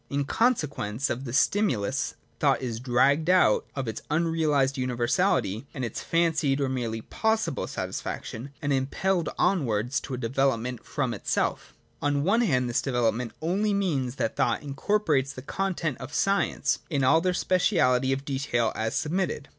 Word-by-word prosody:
In 140 0 -1
consequence 145 - 0
of 130 +3 -3
this 125 +2 0
stimulus 145 - +1 0.2
thought - - +3
is 120 -3 -4
dragged 135 +6 +2
out 180 -13 +4
of 135 -3 -3
its 110 - -4
unrealised 155 -4 +1
universality 120 -3 0
and 130 - -2
its 115 - -5
fancied 160 -5 +1
or 140 - +1
merely 120 -4 -2
possible 220 - -1
satisfaction, 120 +5 -5
and 145 -1 +1
impelled 165 +7 0
onwards 125 - +1
to 130 - -5
a - - -6
develop 130 +1 +1
ment 125 0 -5
from 135 -5 -2
itself. 105 - -2 0.3
On 145 -1 +1
one 210 +8 +3
hand 130 - +2
this 120 - 0
development 120 -2 0
only 200 +5 +1
means 140 -11 -1
that 110 - -2
thought - - +1
incorporates 145 -2 0
the 130 - -9
contents 165 -5 -2
of 130 +3 -7
science, 195 0 +1
in 140 -5 0
all 160 +5 +5
their 185 +1 +1
speciality 140 - +2
of 135 +1 -2
detail 130 -5 0
as 110 +3 -2
submitted. 155 -3 -1
135 Hz, 155 wpm, -27 LUFS, 125-165 Hz, 0.3 s, all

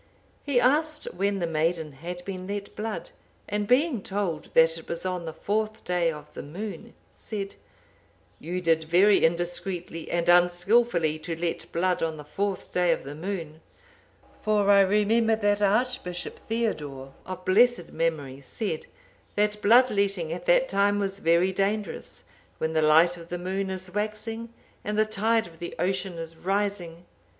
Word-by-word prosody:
He 280 -4 +2
asked 300 +4 +2
when 200 +2 0
the 175 - -1
maiden 160 0 0
had 175 +6 -8
been 185 -2 -5
let 200 0 -5
blood, 225 - -4 0.4
and 205 0 -2
being 255 -1 +3
told 190 -6 -3
that 165 0 +6
it 165 - -9
was 170 +2 -4
on 180 -2 -2
the 160 - -4
fourth 215 +5 -2
day 175 -2 +1
of 150 -1 -11
the - - -6
moon, 210 +8 -7 0.2
said, 200 -3 -6 0.9
'You 180 +3 -4
did 165 -2 +2
very 190 +5 +5
indiscreetly 175 0 -1
and 170 -1 0
unskilfully 175 -1 +3
to 165 +1 -5
let 170 -1 -3
blood 180 +1 +1
on 160 -1 -1
the 150 - -8
fourth 195 +6 -3
day 180 -1 +2
of - - -1
the 140 - -7
moon; 160 -2 -5 0.8
for 205 -1 +3
I 200 - +7
remember 210 +3 +3
that 205 -1 +1
Archbishop 205 -4 0
Theodore,(782) 145 - -2 0.2
of 185 0 -7
blessed 230 -1 +4
memory, 150 -5 -2
said, 160 - -4 0.5
that 210 0 +1
blood 245 +5 +6
letting 195 -5 0
at 175 - -7
that - - +5
time 205 - +2
was 195 -1 -2
very 170 +2 +3
dangerous, 205 +2 -2 0.3
when 160 0 -2
the 160 - +2
light 160 +3 +5
of 170 0 -12
the 175 - -3
moon 190 +2 -2
is 185 -1 -6
waxing 215 +2 -3 0.3
and 210 0 -2
the 215 - +4
tide 220 +2 +1
of 165 -1 -14
the 170 - -6
ocean 185 0 -1
is 165 -1 -7
rising. 190 -3 -2
185 Hz, 160 wpm, -26 LUFS, 165-210 Hz, 0.9 s, I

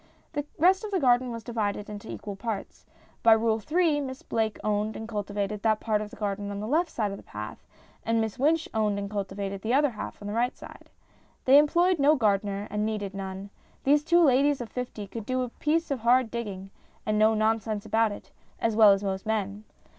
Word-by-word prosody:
The 290 -1 -2
rest 370 +6 +4
of 430 - -4
the 390 -2 0
garden 250 -3 +3
was 230 -1 -6
divided 210 -3 -2
into 210 +1 -8
equal 205 -1 -6
parts. 215 0 -6 0.3
By 230 - +7
Rule 220 0 +2
3 310 +3 +1
Miss 260 -1 -6
Blake 220 -2 -1
owned 210 0 0
and 220 - -6
cultivated 205 -1 -3
that 220 -1 +2
part 215 -2 0
of 210 - -5
the - - -12
garden 205 -1 -3
on 200 0 -4
the 210 - -4
left 325 +7 +1
side 215 -8 -2
of 200 - -6
the - - -11
path, 105 +1 -8 0.4
and 230 0 +1
Miss 220 +2 -2
Wynch 315 +4 +2
owned 210 -2 +1
and 200 0 -4
cultivated 195 -1 -4
the 230 +5 +1
other 290 -1 +3
half 215 - -7
on 205 - -8
the 205 - -3
right 240 +3 0
side. - - -13 0.6
They 270 +2 +8
employed 345 +4 +3
no 290 +2 +5
gardener, 205 -4 0
and 210 0 -1
needed 210 -3 -2
none. 195 0 -6 0.3
These 290 +2 +4
two 345 +2 +4
ladies 280 0 +4
of 240 -2 -6
fifty 245 -4 -5
could 210 +2 -8
do 255 0 0
a 250 - -4
piece 315 +5 -1
of 275 - -1
hard 240 +1 +3
digging 195 -5 -5 0.3
and 215 0 +1
no 220 +1 +5
nonsense 215 -1 0
about 225 -1 +2
it 205 - -10 0.3
as 225 -2 0
well 215 -2 +8
as 195 +1 -2
most 195 0 -3
men. 210 -1 -2
220 Hz, 215 wpm, -27 LUFS, 205-255 Hz, 0.6 s, They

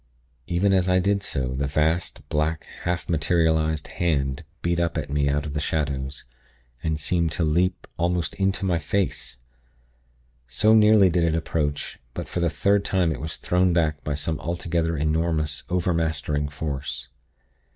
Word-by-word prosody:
Even 90 +3 +2
as 95 -1 +2
I 90 - +4
did 100 +2 +2
so, 65 -8 -3
the 70 +2 -1
vast, 80 +2 0
black, 75 +1 0 0.2
half 90 0 -1
materialized 80 -1 +1
hand 70 -4 -1 0.2
beat 85 0 +1
up 85 -1 0
at 75 -3 -3
me 70 -1 +2
out 75 +1 0
of 75 - -5
the 75 - -1
shadows, 70 -3 -2 0.6
and 80 +1 -1
seemed 85 +1 +1
to 85 - 0
leap 90 +4 +1
almost 85 -1 0
into 95 0 0
my 90 -3 +1
face; 75 -7 -2 1.1
so 85 - +3
nearly 105 -3 +6
did 85 0 +2
it 80 -1 +2
approach; 75 -3 -2 0.2
but - - -4
for - - -3
the 85 -1 +2
third 100 +5 +2
time 90 -5 +1
it 65 - -4
was 80 +1 -4
thrown 90 0 +2
back 75 -3 +1
by 75 - -2
some 75 +1 -2
altogether 85 -1 -1
enormous, 75 -1 0
overmastering 80 -4 0
force. 70 -3 -5
80 Hz, 160 wpm, -24 LUFS, 75-90 Hz, 1.1 s, nearly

